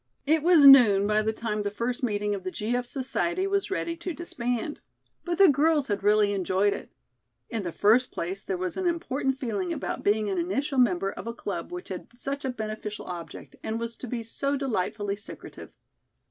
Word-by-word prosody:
It 310 +2 +3
was 330 -3 +6
noon 230 -8 +8
by 210 +1 +2
the 220 +1 0
time 220 -1 -3
the 205 - -1
first 235 +6 -3
meeting 210 -4 0
of 195 -2 -4
the 185 - -3
G. 215 +5 -2
F. 245 0 -2
Society 340 +8 -1
was 395 0 0
ready 340 -4 -2
to 340 0 -5
disband. 245 -4 -3 0.4
But 350 -1 -2
the 395 - +8
girls 295 -1 +3
had 205 -1 -1
really 205 0 +3
enjoyed 195 +1 +1
it. - - -8 0.6
In 225 - -2
the 175 -3 -4
first 230 +8 +3
place, 185 +4 -4
there 190 - -3
was 185 0 -4
an 375 -1 0
important 275 -6 -1
feeling 205 -8 -2
about - - -4
being 210 +1 +2
an 190 -3 -1
initial 260 - -1
member 195 -5 +2
of - - -8
a 230 - -4
club 200 - -5
which 360 -5 -7
had 185 -2 -6
such 275 +3 -4
a 265 - -1
beneficial 215 -3 -5
object, 170 -3 -8
and 220 +1 -3
was 230 0 -4
to 255 - -7
be 235 -1 -3
so 275 +5 -2
delightfully 210 -5 -2
secretive. 210 - -10
225 Hz, 200 wpm, -27 LUFS, 205-275 Hz, 0.6 s, noon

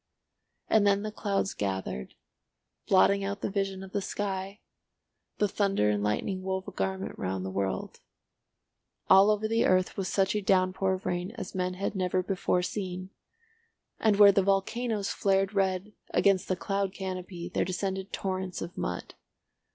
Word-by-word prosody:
And 210 -2 +4
then 200 0 +3
the 215 - -3
clouds 200 -2 -1
gathered, 95 -10 -3 0.7
blotting 200 +1 +4
out 200 +1 -3
the - - -2
vision 195 -1 -2
of 190 - -10
the 200 - -1
sky, 195 +1 -3 0.8
the 210 - +2
thunder 195 - +1
and 105 -1 0
lightning 115 - -1
wove 190 0 -3
a - - -5
garment 190 0 -3
round 95 0 -2
the 95 - -4
world; 95 -1 -3 1.1
all 195 +2 +8
over 215 0 +1
the 225 +1 +2
earth 185 0 +2
was 195 -2 -1
such 195 +1 +1
a 210 - +1
downpour 190 0 +2
of 185 - -5
rain 180 +4 -2
as 185 - -6
men 180 -1 -1
had 195 +2 -2
never 185 -1 0
before 180 -1 0
seen, 185 -1 -4 0.9
and 215 -2 +3
where 200 0 +9
the 195 - +3
volcanoes 200 +2 0
flared 195 0 +1
red 195 +1 0 0.2
against 195 -2 +3
the 185 - +1
cloud 195 +2 -2
canopy 185 -2 -5
there - - +2
descended 190 +1 -3
torrents 185 -1 -3
of 170 - -8
mud. 90 - -4
190 Hz, 160 wpm, -29 LUFS, 185-200 Hz, 1.1 s, where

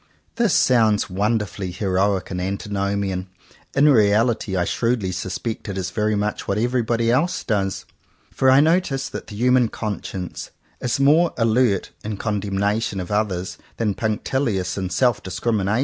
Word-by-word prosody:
This 235 -3 +3
sounds 110 -6 +3
wonderfully 105 -1 -1
heroic 95 +1 0
and 90 -1 -3
anti 100 +2 -4
nomian; 100 -2 -1 0.5
in 140 +2 +5
reality 110 -4 +3
I 90 - +1
shrewdly 115 -4 0
suspect 95 +5 -4
it 95 - -4
is 95 -1 -3
very 105 +2 0
much 105 +1 -2
what 100 - 0
everybody 115 0 +1 0.4
does: 100 -4 -1 0.5
for 130 - +2
I 135 +2 +7
notice 155 -4 +1
that - - -7
the 105 - -9
human 125 +1 +3
conscience 100 -4 -5 0.3
is 125 +1 -1
more 155 +5 +4
alert 115 -3 +2
in 105 -1 -4
condemnation 100 0 -1
of 90 +1 -6
others 95 -4 -1 0.2
than 110 -3 0
punc 110 +1 -2
tilious 115 -9 -1
in 95 -2 -3
self 120 +6 +2
discrimination. 105 +2 -1
105 Hz, 150 wpm, -22 LUFS, 95-120 Hz, 0.5 s, I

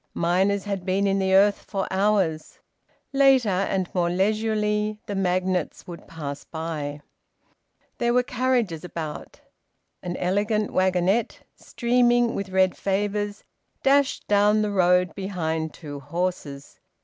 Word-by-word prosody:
Miners 190 +4 +1
had 200 -3 -4
been 190 +2 0
in 195 0 +1
the 190 0 +2
earth 200 +1 +4
for 195 -2 -3
hours. 190 -5 0 0.6
Later, 270 -4 +4
and 190 -1 0
more 175 -2 +1
leisurely, 210 +2 0
the 205 - -5
magnates 185 -2 -1
would 175 -1 -10
pass 145 -3 -6
by. 155 -3 -5 1.0
There 240 -1 +1
were 250 - +4
carriages 245 -9 -1
about. 165 -4 -7 0.6
An 175 0 -4
elegant 205 +3 0
wagonette, 185 +4 +1
streaming 240 -1 +1
with 195 -1 -4
red 190 -1 +2
favours, 205 +1 -2 0.4
dashed 275 0 +2
down 210 +1 +3
the 210 - -1
road 180 -2 +3
behind 160 -5 -3
two 145 -3 -9
horses. 145 -2 -4
190 Hz, 125 wpm, -24 LUFS, 175-210 Hz, 1.0 s, earth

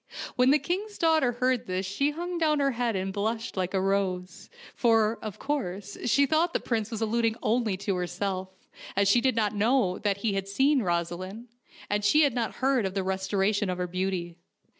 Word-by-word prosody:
When 250 +1 +4
the 290 - +6
king's 395 +7 -3
daughter 315 -7 +3
heard 255 0 0
this 185 +1 -2
she 205 +10 0
hung 345 +3 -4
down 305 -2 +2
her 275 -1 +2
head 240 -2 -1
and 190 0 -2
blushed 220 +3 -2
like 185 0 -2
a - - +3
rose, 185 -2 -2 0.2
for, 225 -2 +2
of 215 -3 -6
course, 205 -9 -3
she 280 +4 +4
thought 320 +5 +1
the - - +1
prince 225 -3 -2
was 225 -1 -5
alluding 225 0 +1
only 220 -3 +1
to 200 +1 -2
herself, 185 +1 -3 0.5
as 200 0 +3
she 235 +5 +4
did 260 -1 +2
not 215 -2 +1
know 210 -2 +2
that 205 -2 0
he 205 0 -1
had 195 0 -2
seen 265 +7 +2
Rosaleen, 185 +5 -3 0.4
and 205 0 -1
she 300 +10 +5
had 285 -4 +2
not 235 -2 -2
heard 260 -5 +1
of 190 - -7
the 195 - +1
restora 190 +2 0
tion 205 -1 -1
of 180 - -2
her 180 - -1
beauty. 180 -1 -3
215 Hz, 205 wpm, -27 LUFS, 190-255 Hz, 0.5 s, the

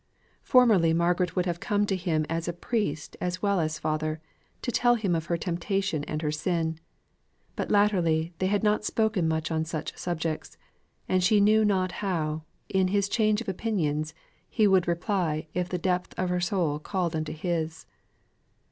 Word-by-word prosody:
Formerly 215 -10 +5
Margaret 175 +1 +1
would 180 -1 +1
have 170 -2 -2
come 205 +2 +1
to 195 - 0
him 170 -4 0
as 165 +1 -2
priest 180 -11 -2
as 180 +2 -3
well 200 -2 +2
as 155 -1 -1
father, 155 +1 -2 0.4
to 245 - -1
tell 240 +1 +4
him 205 -6 0
of 165 0 -1
her 170 - 0
temptation 175 -1 -1
and 155 +1 -4
her 150 - 0
sin; 160 0 -1 0.8
but - - -3
latterly 175 -6 +2
they 185 - +1
had 205 +2 +1
not 210 0 +2
spoken 215 -5 +1
much 160 +1 -1
on 160 0 +1
such 160 -1 -5
subjects; 165 -2 -3 0.5
and 185 -1 +2
she 210 +3 +4
knew 215 +2 +5
not 190 -3 +1
how, 160 -6 -2 0.3
in 190 -2 +2
his 200 +1 +1
change 215 0 +2
of 235 - -8
opinions, 160 -7 -1 0.3
he 215 - +2
would 190 -3 +4
reply 170 -3 0
if 180 0 -1
the 180 - -1
depth 180 +1 -1
of 185 -1 0
her 180 0 0
soul 175 -5 0
called 175 0 -2
unto 155 -1 -2
his. 160 -1 -3
180 Hz, 175 wpm, -27 LUFS, 160-200 Hz, 0.8 s, Formerly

